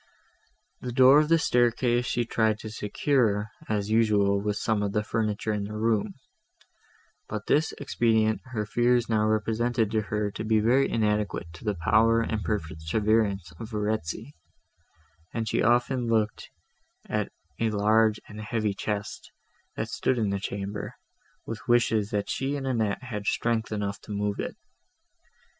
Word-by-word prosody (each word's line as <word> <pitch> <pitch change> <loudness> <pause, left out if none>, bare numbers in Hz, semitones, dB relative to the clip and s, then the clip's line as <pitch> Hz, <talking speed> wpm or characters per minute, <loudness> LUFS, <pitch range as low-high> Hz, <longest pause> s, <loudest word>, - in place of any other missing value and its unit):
The 125 - -4
door 130 +4 +7
of 155 0 +1
the 165 - +6
staircase 120 -3 +2
she 120 -1 0
tried 110 -2 +1
to 110 - -7
secure, 110 -1 0 0.2
as 105 -1 -1
usual, 105 -3 +3
with 105 0 -1
some 110 -1 0
of 100 -1 -1
the 105 - +1
furniture 110 0 -1
of 105 -1 -2
the 105 +1 -6
room; 110 -1 0 1.1
but 105 0 -4
this 150 +2 +2
expedient 110 -5 +1
her 115 -5 -3
fears 120 +2 +2
now 110 -1 +2
represented 110 +1 0
to 110 -1 +1
her 105 0 -2
to 110 - -5
be 110 0 +2
very 125 +6 +3
inadequate 105 -6 -1
to 80 - -12
the 105 -1 0
power 115 +4 +4
and 110 -2 -2
perseverance 100 +2 0
of 110 - -7
Verezzi; 110 - -3 1.0
and 115 -1 -2
she - - +1
often 120 +2 +2
looked 110 -2 0 0.6
at - - -2 0.3
a 115 - +2
large 110 +1 +3
and 105 0 -9
heavy 110 -1 -1
chest, 105 +1 -4 0.5
that - - -2
stood 130 - 0
in 105 -4 0
the 100 - -1
chamber, 100 +1 -5 0.5
with 115 +3 -7
wishes 115 -4 +3
that 105 -1 -1
she 135 +2 -2
and 140 -2 -4
Annette 115 -3 -1
had 105 -4 -5
strength 115 -1 0
enough 100 -1 -3
to - - -11
move 105 0 -2
it. - - -3
110 Hz, 155 wpm, -27 LUFS, 105-115 Hz, 1.1 s, door